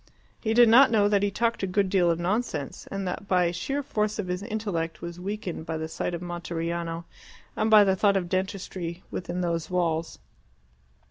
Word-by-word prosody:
He 220 Hz, -1 st, -1 dB
did 240 Hz, 0 st, +8 dB
not 255 Hz, +4 st, +7 dB
know 210 Hz, -3 st, +4 dB
that 205 Hz, -1 st, +2 dB
he 205 Hz, -, +2 dB
talked 230 Hz, +3 st, 0 dB
a 195 Hz, -, 0 dB
good 195 Hz, +1 st, +1 dB
deal 185 Hz, -2 st, +3 dB
of 165 Hz, -, +2 dB
nonsense, 175 Hz, -, -2 dB
and 195 Hz, -1 st, -3 dB
that 195 Hz, +2 st, -5 dB
the 180 Hz, -2 st, +3 dB
sheer 270 Hz, +12 st, -3 dB
force 215 Hz, -5 st, -1 dB
of 195 Hz, -4 st, -3 dB
his 180 Hz, +1 st, -2 dB
intellect 200 Hz, -7 st, -3 dB
was 170 Hz, 0 st, -6 dB
weakened 190 Hz, -4 st, -5 dB
by 160 Hz, 0 st, -2 dB
the 160 Hz, 0 st, -3 dB
sight 170 Hz, +2 st, -3 dB
of 170 Hz, -, -6 dB
Monteriano, 170 Hz, -1 st, -4 dB, 0.5 s
and 215 Hz, -, +1 dB
by 215 Hz, -1 st, +8 dB
the 190 Hz, -1 st, +3 dB
thought 200 Hz, +1 st, +3 dB
of 180 Hz, -2 st, -2 dB
dentistry 185 Hz, -2 st, -3 dB
within 180 Hz, 0 st, -3 dB
those 170 Hz, -2 st, -1 dB
walls. 170 Hz, -3 st, -1 dB
185 Hz, 195 wpm, -26 LUFS, 170-210 Hz, 0.5 s, did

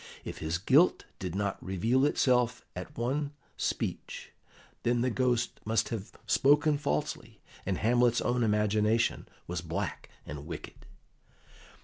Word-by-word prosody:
If -, -, -6 dB
his 80 Hz, +2 st, -1 dB
guilt 135 Hz, -, +4 dB
did 90 Hz, -2 st, -4 dB
not 100 Hz, -1 st, -2 dB
reveal 115 Hz, +9 st, +2 dB
itself 125 Hz, -3 st, +2 dB
at 90 Hz, 0 st, -7 dB
one 140 Hz, +5 st, -1 dB, 0.2 s
speech, -, -, -3 dB, 0.5 s
then 120 Hz, 0 st, +1 dB
the 125 Hz, +1 st, +1 dB
Ghost 125 Hz, -1 st, 0 dB
must 110 Hz, +1 st, +1 dB
have 110 Hz, -4 st, -5 dB
spoken 145 Hz, +1 st, +4 dB
falsely, 75 Hz, -, -2 dB, 0.3 s
and 95 Hz, -2 st, 0 dB
Hamlet's 120 Hz, +1 st, +3 dB
own 125 Hz, 0 st, 0 dB
imagination 105 Hz, +1 st, +2 dB, 0.2 s
was 85 Hz, -1 st, -3 dB
black 85 Hz, 0 st, -4 dB, 0.2 s
and 75 Hz, +1 st, -7 dB
wicked. 85 Hz, -3 st, -8 dB
115 Hz, 125 wpm, -30 LUFS, 95-125 Hz, 0.5 s, guilt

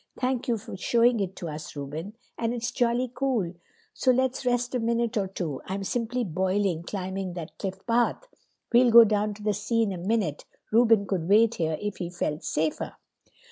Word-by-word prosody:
"Thank 255 Hz, 0 st, -1 dB
you 235 Hz, -2 st, +1 dB
for 200 Hz, -, -8 dB
showing 235 Hz, +4 st, +3 dB
it 190 Hz, -1 st, -2 dB
to 170 Hz, -, -6 dB
us, 155 Hz, -1 st, -7 dB
Reuben. 155 Hz, +9 st, -6 dB, 0.2 s
And 235 Hz, +1 st, -1 dB
it's 235 Hz, 0 st, -3 dB
jolly 240 Hz, +1 st, +1 dB
cool. 240 Hz, -12 st, 0 dB, 0.5 s
Do 255 Hz, -, +5 dB
let's 260 Hz, 0 st, 0 dB
rest 245 Hz, +1 st, +1 dB
a 250 Hz, -, +1 dB
minute 235 Hz, 0 st, 0 dB
or 200 Hz, -3 st, +1 dB
two. 170 Hz, -7 st, -4 dB
I'm 195 Hz, +1 st, -3 dB
simply 245 Hz, +4 st, -1 dB
boiling, 190 Hz, -1 st, 0 dB
climbing 190 Hz, 0 st, -4 dB
that 170 Hz, -2 st, -7 dB
cliff 190 Hz, -1 st, -5 dB
path. 240 Hz, -, +1 dB, 0.5 s
We'll 245 Hz, +1 st, +6 dB
go 235 Hz, 0 st, +10 dB
down 210 Hz, -1 st, 0 dB
to 210 Hz, -, -12 dB
the 210 Hz, 0 st, +1 dB
sea 225 Hz, +3 st, 0 dB
in 210 Hz, -, -1 dB
a 180 Hz, -, -6 dB
minute. 190 Hz, -5 st, -1 dB, 0.3 s
Reuben 225 Hz, -2 st, +5 dB
could 180 Hz, -4 st, -2 dB
wait 220 Hz, +3 st, +5 dB
here 160 Hz, -4 st, -1 dB
if 205 Hz, -1 st, -4 dB
he 175 Hz, -2 st, -4 dB
felt 165 Hz, -3 st, -3 dB
safer." 155 Hz, 0 st, -2 dB
210 Hz, 190 wpm, -27 LUFS, 185-235 Hz, 0.5 s, go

